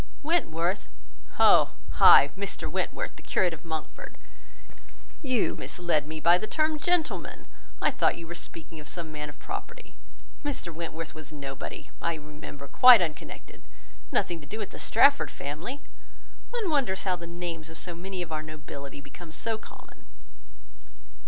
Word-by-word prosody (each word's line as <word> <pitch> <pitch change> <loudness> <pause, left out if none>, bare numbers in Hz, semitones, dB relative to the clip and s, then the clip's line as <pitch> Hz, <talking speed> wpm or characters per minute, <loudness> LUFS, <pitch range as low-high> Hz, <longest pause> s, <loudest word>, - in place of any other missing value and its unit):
"Wentworth? 195 - +1 0.5
Oh! - - +6 0.2
ay,—Mr 190 +8 +6
Wentworth, - - -3
the - - -11
curate 180 -2 +1
of 160 - -9
Monkford. 160 -2 -6 1.1
You 255 -7 +1
misled 170 -5 -1
me 155 0 -5
by 170 +3 +5
the 215 - -3
term 310 +2 +1
gentleman. 350 +1 0 0.4
I - - +4
thought - - +2
you 170 - -7
were 170 - -6
speaking 165 -2 -7
of 150 - -11
some 165 -2 -4
man 150 -1 -5
of 145 - -12
property: - - -7 0.5
Mr 265 - -3
Wentworth 165 -1 -5
was 155 0 -10
nobody, 140 -3 -7
I 170 0 0
remember; 150 -2 -9
quite 250 - +9
unconnected; 160 -4 -5 0.5
nothing 170 -2 0
to 145 - -13
do 215 - -5
with 205 -3 -5
the - - -9
Strafford 280 +5 +5
family. 160 - -6 0.7
One 455 -8 -1
wonders 255 -11 +1
how 185 -2 +1
the 170 -1 -8
names 170 -2 -5
of 170 +2 -4
many 185 0 -4
of 165 - -11
our 155 -1 -2
nobility 145 -2 -8
become 160 +3 -12
so 220 +6 -3
common." - - -15
170 Hz, 150 wpm, -28 LUFS, 155-205 Hz, 1.1 s, quite